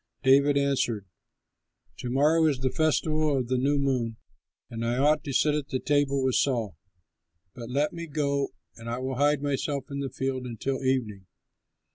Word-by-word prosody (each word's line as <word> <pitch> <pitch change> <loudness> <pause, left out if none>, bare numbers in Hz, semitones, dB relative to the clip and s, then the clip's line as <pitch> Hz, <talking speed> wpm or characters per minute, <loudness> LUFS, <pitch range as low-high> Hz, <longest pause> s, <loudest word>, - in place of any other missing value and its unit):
David 140 +2 +5
answered, 130 -7 0 0.9
"To 125 - -4
morrow 155 +5 +3
is 145 -4 +1
the 130 -1 0
festival 155 -2 +1
of 125 -2 -2
the 130 - +1
New 140 +3 +2
Moon 125 -5 0 0.5
and 115 0 -6
I 120 +1 0
ought 150 +3 +3
to 140 - -3
sit 150 +3 +2
at 150 -2 -2
the 130 - -2
table 140 -1 +1
with 130 -1 +1
Saul, 115 -9 0 0.8
but 120 -1 -8
let 145 +4 0
me 170 0 -6
go 140 -2 -1 0.3
and 115 0 -9
I 120 - -2
will 130 0 -3
hide 145 0 +2
myself 140 0 -1
in 140 - -3
the 140 -1 -3
field 130 0 -3
until 130 +3 -3
evening. 110 -8 -1
135 Hz, 175 wpm, -27 LUFS, 125-145 Hz, 0.9 s, David